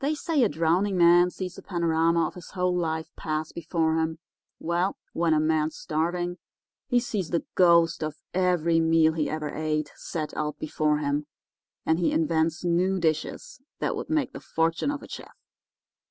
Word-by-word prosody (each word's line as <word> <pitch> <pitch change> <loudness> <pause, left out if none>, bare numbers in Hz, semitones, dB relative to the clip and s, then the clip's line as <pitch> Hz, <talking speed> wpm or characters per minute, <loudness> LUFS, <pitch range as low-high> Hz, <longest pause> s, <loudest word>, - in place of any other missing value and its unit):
"They 290 +3 0
say 305 -1 0
a 230 - +4
drowning 180 +5 +1
man 175 +1 +6
sees 180 0 -6
a - - -10
panorama 165 -1 +1
of - - -4
his 180 -2 -11
whole 180 -1 0
life 160 -2 -2
pass 155 0 -3
before 160 -1 0
him. 160 0 -1 0.4
Well, 175 +3 -1 0.2
when 170 -1 +1
a - - +3
man's 155 0 +1
starving 175 +3 -2 0.5
he 245 -2 +3
sees 210 -8 -3
the 170 - -1
ghost 170 -2 +4
of 155 -1 -3 0.2
every 175 -3 +2
meal 160 -1 +4
he 155 -2 -1
ever 155 -1 -3
ate 155 -1 -2
set 155 -3 -5
out 150 0 -2
before 150 0 0
him, 145 0 -1 0.6
and 160 +1 +2
he 175 - +2
invents 160 +1 0
new 180 +2 +2
dishes 170 - -2 0.2
that - - -1
would - - -5
make 310 -3 0
the - - -7
fortune 165 - 0
of 285 0 -3
a - - -10
chef. - - -10
165 Hz, 175 wpm, -26 LUFS, 160-180 Hz, 0.6 s, man